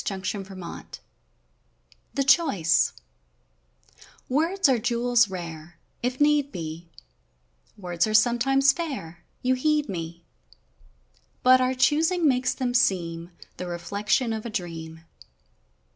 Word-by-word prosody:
DAY 195 - -3
DREAMS 190 -2 -7 1.2
THE 275 - +2
CHOICE 200 - +3 1.4
Words 330 +7 +2
are 260 -3 +3
jewels 240 -1 +2
rare 165 -3 -8
— - - -43
If 250 +1 -2
need 295 -1 +3
be 165 0 -7 0.9
Words 175 -1 -1
are 215 - 0
sometimes 250 +5 +4
fair 215 - -6 0.2
You 255 +1 +3
heed 300 +3 +1
me, 170 -2 -6 1.2
But 255 0 +6
our 255 +1 +1
choosing 320 +6 +2
makes 255 -2 +1
them 250 -2 -2
seem 175 -8 0 0.3
The 180 - -5
reflection 200 +7 -1
of 220 -1 -4
a 235 - -5
dream. 165 -5 -6
225 Hz, 115 wpm, -25 LUFS, 175-265 Hz, 1.4 s, But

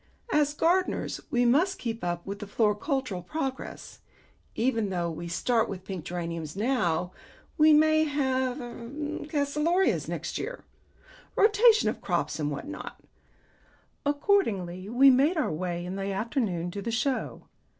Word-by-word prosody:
As 295 -1 +2
gardeners 360 +4 +1
we 245 0 +2
must 325 +11 +3
keep 230 -1 -4
up 175 -1 -2
with 200 +1 -5
floricultural 210 - -1
progress. 270 - -5 0.6
Even 225 -3 +1
though 175 -2 -1
we 170 +2 -6
start 225 +6 +1
with 190 -1 -7
pink 190 -5 -6
geraniums 170 -3 -4
now, 185 -7 0 0.4
we 310 0 +6
may 310 +1 +5
have 265 -3 0
er 240 -2 -8 0.4
calceolarias 300 +5 +1
next - - -4
year. - - -6 0.7
Rotation 435 +2 +5
of - - -2
crops - - -1
and 150 -1 0
what 145 - -5
not." 300 - -7 1.0
Accordingly 220 - 0
we 265 +4 +7
made 285 +7 +3
our 310 - +1
way 175 +2 -3
in 185 +2 -5
the 195 0 -2
afternoon 195 - -1
to 200 - -5
the 230 - -3
Show. 250 +3 -1
235 Hz, 140 wpm, -28 LUFS, 185-295 Hz, 1.0 s, we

